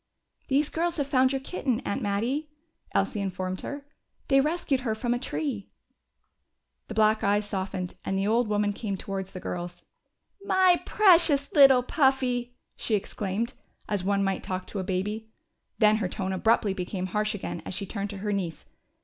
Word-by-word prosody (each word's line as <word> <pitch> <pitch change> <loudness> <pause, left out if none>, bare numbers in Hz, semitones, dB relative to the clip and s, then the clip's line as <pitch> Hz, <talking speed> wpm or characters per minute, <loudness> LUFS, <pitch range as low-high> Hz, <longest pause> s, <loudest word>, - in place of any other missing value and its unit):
"These 280 +2 +2
girls 340 +1 -1
have 285 - 0
found 260 -1 +3
your 270 - 0
kitten, 265 -5 -1
Aunt 200 - -3
Mattie," 240 +10 -1 0.4
Elsie 210 - 0
informed 185 -1 -3
her. 285 0 -6 0.4
"They 275 0 +6
rescued 300 -2 0
her 225 -4 -1
from 240 +2 0
a 245 - -1
tree." 255 -5 -3 1.2
The - - -7
black 215 0 +3
eyes 205 +1 +2
softened, 190 -2 -3
and 195 - -1
the 195 - 0
old 230 +3 +2
woman 205 -1 +1
came 200 -2 -3
towards 195 0 -5
the 185 - -7
girls. 175 0 -5 0.6
"My 375 -2 +4
precious 335 -8 +5
little 270 -3 +7
Puffy!" 255 -3 +1 0.2
she 220 - 0
exclaimed, 210 +3 -2 0.3
as 205 -3 -1
one 200 +1 +1
might 195 -1 0
talk 185 0 -4
to 205 - -5
a - - -2
baby. 210 +4 -3 0.5
Then 215 -1 +5
her 195 -4 -1
tone 190 -1 -3
abruptly 210 0 +2
became 185 0 -3
harsh 210 +3 -1
again 200 - -5
as - - -5
she 200 - -3
turned 200 +1 -4
to 200 - -6
her 210 - 0
niece. 175 -5 -3
215 Hz, 175 wpm, -27 LUFS, 195-265 Hz, 1.2 s, little